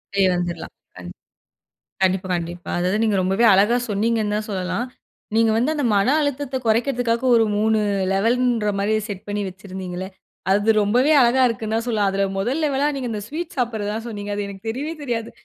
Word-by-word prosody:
போய் 195 -1 +4
வந்துறலாம். 175 -2 -4 0.3
அந் 90 -1 -8 0.9
கண்டிப்பா, 185 0 +1
கண்டிப்பா. 175 +1 -6
அதாவது 180 +3 +1
நீங்க 215 -2 +2
ரொம்பவே 195 +5 +2
அழகா 205 +5 +4
சொன்னீங்கன்னு 215 0 0
தான் 215 - -4
சொல்லலாம். 185 +3 -2 0.5
நீங்க 225 0 +4
வந்து 250 +7 +1
அந்த 290 - -1
மன 200 +2 +3
அழுத்தத்தை 285 -2 -2
குறைக்கிறதுக்காக 235 +1 +1
ஒரு 225 -1 +4
3 220 +1 +2 0.4
லெவல்ன்ற 230 +1 +1
மாரி 205 +2 +1
செட் 200 -3 -7
பண்ணி 205 0 -2
வச்சிருந்தீங்கல்ல, 185 -1 -7 0.4
அது 205 +3 +2
ரொம்பவே 245 +8 +3
அழகா 245 +2 +4
இருக்குன்னு 220 -1 -3
தான் 230 +1 -1
சொல்லலாம். 210 -4 +1
அதில 195 0 +1
முதல் 255 +11 -1
லெவலா 285 -1 +1
நீங்க 260 -3 -3
இந்த 210 -2 -4
ஸ்வீட் 325 +6 -6
சாப்பிடுறது 225 -5 -1
தான் 225 +1 -5
சொன்னீங்க. 205 -2 -5
அது 205 0 -2
எனக்கு 200 +2 -9
தெரியவே 280 +8 -3
தெரியாது. 230 -4 -3
220 Hz, 170 wpm, -22 LUFS, 195-240 Hz, 0.9 s, போய்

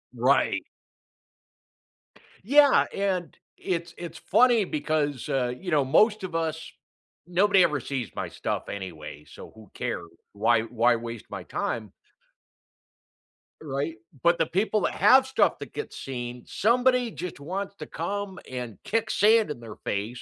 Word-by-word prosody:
Right. - - +2 1.8
Yeah, 285 +5 +6
and 190 -3 -1 0.2
it's 170 -2 -3
it's 170 -2 -7
funny 240 -4 +4
because, 150 -4 -1
uh, 125 -3 0
you 180 +3 -6
know, 145 -3 +3
most 210 - +3
of 175 -3 -5
us 160 -1 -2 0.6
nobody 190 +2 +4
ever 150 -4 +1
sees 125 -2 -4
my - - -3
stuff - - -4
anyway, 80 -6 -7
so - - -12
who 110 -3 -15
cares, 85 - -4 0.2
why 110 +2 +3
why 120 +1 +2
waste 115 -1 -6
my - - -6
time? 110 -4 -3 1.7
Right, 140 +1 -3 0.3
but 170 0 +4
the 165 - +3
people 205 +5 0
that - - 0
have 260 +1 +6
stuff 265 - +2
that - - -9
gets 440 - -6
seen, 125 -2 -6
somebody 245 +1 +2
just 180 -5 -6
wants 190 +7 -4
to 155 - -8
come 195 +4 -4
and 125 -5 -6
kick 225 +1 -1
sand 215 -1 +4
in 135 - -6
their 110 -2 -9
face 105 +5 -3
160 Hz, 145 wpm, -26 LUFS, 120-200 Hz, 1.8 s, Yeah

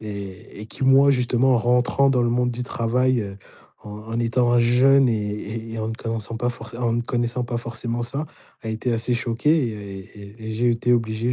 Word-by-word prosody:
et 100 -2 -8
et 105 - -8
qui 125 - -8
moi, 135 +1 +6
justement, 125 0 +2
rentrant 125 +3 +2
dans 125 -2 +2
le 120 - +2
monde 125 +1 +1
du 120 +1 -4
travail, 125 +1 +1
heu, 100 -1 -7 0.5
en 105 - -9 0.2
en - - -1
étant 120 +1 +2
un 120 - +4
jeune 130 +3 +5
et 110 +1 -4
et 115 - -5
en 110 0 -2
ne 115 - -3
connaissant 115 0 -5
pas 120 - 0
forcément 120 +1 -5
en 115 - +1
ne 120 - 0
connaissant 120 +1 -1
pas 120 -1 -3
forcément 120 0 -4
ça, 135 +6 -3 0.4
a 110 - -6
été 115 +2 -2
assez 115 +2 -1
choqué 120 +4 0
et 105 -8 -3 0.2
et 105 +2 -11
et - - -3
j'ai 120 +2 +2
été 120 +1 +1
obligé, 115 +1 -1
120 Hz, 210 wpm, -23 LUFS, 110-125 Hz, 0.5 s, moi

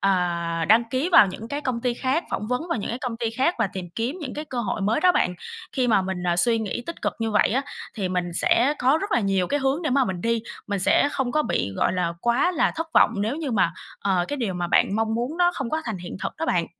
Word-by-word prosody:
à, 170 -3 0
đăng 225 +2 +6
ký 265 +7 0
vào - - +8
những 215 +4 -7
cái 290 +1 -3
công 250 -4 -2
ty 245 -1 0
khác, 265 +7 -1
phỏng 210 - -3
vấn 250 +8 -2
vào 335 - -1
những - - -4
cái 240 - -3
công 250 -3 -4
ty 230 -1 -2
khác 265 +9 +1
và 225 - +2
tìm 180 -3 -6
kiếm 240 +9 -2
những 265 -5 -5
cái 300 - -5
cơ 255 -5 -4
hội 215 - -2
mới 210 +7 +1
đó 365 +1 +5
bạn. 180 - +1 0.4
Khi 255 -2 0
mà 200 -4 +4
mình, 185 -1 -4
à, 175 0 +1
suy 225 +6 +4
nghĩ 220 +2 -3
tích 335 - -7
cực - - 0
như 225 -1 -1
vậy 210 - +3
á, 260 +6 0 0.3
thì 195 -4 -2
mình 180 -1 -2
sẽ 260 +10 +3
có 265 +5 +3
rất 400 +4 -4
là 240 - +3
nhiều 195 -3 +1
cái 290 0 -1
hướng 270 +5 0
để 305 - -1
mà 270 0 +3
mình 185 -5 -4
đi. 230 +1 0 0.2
Mình 200 -1 -2
sẽ 285 - +4
không 260 -3 -1
có 305 - +2
bị, 100 - -1
gọi - - +1
là, 175 -2 -1
quá 240 +9 +2
là - - +2
thất 325 0 -2
vọng - - +6
nếu 220 +8 -1
như 310 -4 -3
mà, 185 -7 +2 0.3
ờ, 185 -3 +1
cái 290 - -2
điều 215 -8 -2
mà 175 -1 -2
bạn 195 +3 +3
mong 225 0 0
muốn 245 +8 -2
nó 350 0 +4
không 265 -5 -4
có 315 0 -1
thành 220 -6 -4
hiện 180 +1 -7
thực - - -2
đó 325 +1 -3
bạn. 170 - +1
230 Hz, 285 wpm, -24 LUFS, 190-270 Hz, 0.4 s, vào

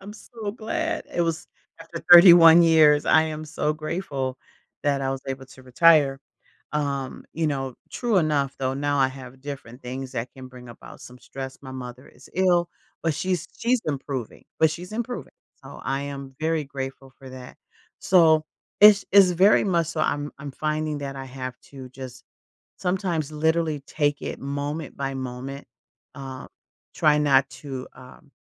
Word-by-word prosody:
I'm 200 +2 -10
so 220 -2 -7
glad, 235 +9 -3
it - - 0
was 165 -2 -1 0.3
after 165 0 -8
31 170 -1 +10
years, 155 -3 +5
I 160 - +5
am 155 -1 -5
so 150 0 -1
grateful 150 -5 -4 0.4
that 140 -2 +1
I 135 0 -1
was 135 0 -4
able 135 0 -5
to 130 0 -16
retire, 140 +1 +4 0.5
um, 140 -3 -3
you 160 0 0
know, 135 -4 -2 0.2
true 235 -5 -1
enough, 145 -4 0
though, 130 0 -1
now 145 0 -1
I 130 - +4
have 130 -1 -11
different 135 -3 -9
things 130 +1 -6
that 120 0 -4
can 130 -1 -10
bring 125 -1 -13
about 120 - -13
some 125 0 -13
stress 130 0 -8
my 130 - -9
mother 125 0 -9
is - - -18
ill, 175 -2 +2 0.3
but 165 -2 0
she's 180 +1 -2
she's 240 0 +1
improving 135 -5 -5 0.2
but 160 - +5
she's 175 +3 -7
improving, 240 +2 -5 0.3
so - - -11
I 135 +1 -1
am 140 -1 -7
very 160 -1 0
grateful 135 -1 -7
for 135 - -12
that, 130 -1 -11 0.4
so 160 -4 +4 0.4
it's 210 -1 +8
it's 195 -2 +7
very 190 +4 +5
much 170 -5 +1
so, 170 - -3
I'm-I'm 145 -1 -3
finding 155 0 -2
that 140 -1 -5
I 135 - -6
have 130 -1 -7
to 135 -2 -10
just, 130 -1 -10 0.5
sometimes, 180 -5 -2
literally, 160 -1 0
take 145 -1 -1
it - - -5
moment 145 +2 -4
by 135 -1 -3
moment, 130 +2 -6 0.5
uh, 135 -2 -8 0.5
try 150 -1 +3
not 135 -2 +3
to, 130 0 -8
um, 130 +3 -16
145 Hz, 165 wpm, -24 LUFS, 135-165 Hz, 0.5 s, 31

